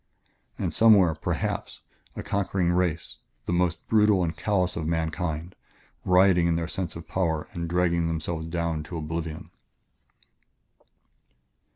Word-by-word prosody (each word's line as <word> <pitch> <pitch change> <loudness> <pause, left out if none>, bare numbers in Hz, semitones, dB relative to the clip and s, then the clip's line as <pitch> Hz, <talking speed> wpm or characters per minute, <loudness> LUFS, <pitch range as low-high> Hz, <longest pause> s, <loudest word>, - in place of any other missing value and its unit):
"And - - -2
somewhere, 100 -7 +6
perhaps, 80 - -3 0.3
a - - -5
conquering 95 -3 0
race, 90 -2 -1 0.3
the - - -1
most 85 -2 0
brutal 105 -4 +4
and 80 -2 -2
callous 90 +1 0
of 80 -2 -3
mankind, 80 +1 -2 0.5
rioting 90 -1 +5
in 85 - +2
their 85 0 -2
sense 90 0 -4
of 85 - -9
power 80 -4 -1
and 85 -1 -4
dragging 85 -1 +1
themselves 80 0 -3
down 85 -2 -2
to 85 - -6
oblivion...." 80 0 -5
85 Hz, 130 wpm, -26 LUFS, 80-90 Hz, 0.5 s, somewhere